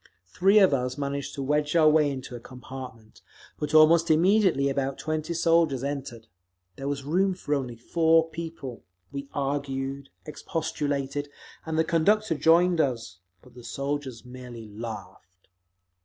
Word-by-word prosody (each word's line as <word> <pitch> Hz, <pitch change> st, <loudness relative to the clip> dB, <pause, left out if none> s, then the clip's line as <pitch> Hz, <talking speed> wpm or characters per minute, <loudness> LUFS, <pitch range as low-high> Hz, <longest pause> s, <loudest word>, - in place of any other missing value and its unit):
Three 190 Hz, -, +3 dB
of 190 Hz, -7 st, +6 dB
us 125 Hz, 0 st, -1 dB
managed 140 Hz, 0 st, -3 dB
to 140 Hz, -, -4 dB
wedge 150 Hz, +2 st, 0 dB
our 160 Hz, -2 st, +6 dB
way 155 Hz, -1 st, +4 dB
into 130 Hz, -2 st, -6 dB
a -, -, -7 dB
compartment, 125 Hz, -3 st, -11 dB, 0.4 s
but 150 Hz, +1 st, -2 dB
almost 165 Hz, +2 st, +6 dB
immediately 175 Hz, -3 st, +4 dB
about 135 Hz, 0 st, -1 dB
twenty 155 Hz, +1 st, -3 dB
soldiers 165 Hz, -5 st, +2 dB
entered…. 135 Hz, -5 st, -5 dB, 0.5 s
There 135 Hz, -, -6 dB
was 140 Hz, -1 st, -3 dB
room 185 Hz, +6 st, +1 dB
for 150 Hz, -5 st, -3 dB
only 130 Hz, -4 st, -2 dB
four 160 Hz, +6 st, +2 dB
people; 160 Hz, -7 st, -7 dB, 0.3 s
we 140 Hz, 0 st, -6 dB
argued, 135 Hz, -1 st, -3 dB, 0.2 s
expostulated, 145 Hz, -2 st, -3 dB, 0.4 s
and 160 Hz, 0 st, -2 dB
the 160 Hz, -, +4 dB
conductor 200 Hz, +5 st, +2 dB
joined 165 Hz, +3 st, +4 dB
us—but 105 Hz, -, -5 dB
the 125 Hz, 0 st, -13 dB
soldiers 140 Hz, -1 st, -4 dB
merely 125 Hz, -3 st, -10 dB
laughed. 100 Hz, -4 st, -9 dB
140 Hz, 140 wpm, -26 LUFS, 130-160 Hz, 0.5 s, of